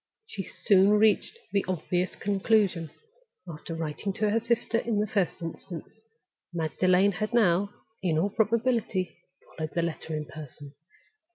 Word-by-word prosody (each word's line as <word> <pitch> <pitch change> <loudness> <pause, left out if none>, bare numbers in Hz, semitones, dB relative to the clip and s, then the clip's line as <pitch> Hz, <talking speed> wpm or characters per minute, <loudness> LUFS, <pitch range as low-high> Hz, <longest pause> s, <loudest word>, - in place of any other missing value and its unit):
She 455 0 -4
soon 195 -2 +3
reached 215 - +3
the 200 -1 +2
obvious 180 0 -1
conclusion. 195 -4 +1 0.6
After 165 0 -7
writing 165 +5 -3
to 210 +1 +1
her 225 - +3
sister 230 0 +1
in 230 -3 -1
the 210 - +2
first 195 -5 -1
instance, 165 +1 -7 0.6
Magdalen 180 +4 +3
had 215 +5 -2
now, 200 -3 +4 0.3
in 170 -4 +1
all 195 +6 +1
probability, 225 -4 +1 0.4
followed 155 -1 -5
the 170 - +2
letter 160 -1 -3
in 150 0 -3
person. 145 -2 -10
190 Hz, 140 wpm, -28 LUFS, 165-215 Hz, 0.6 s, now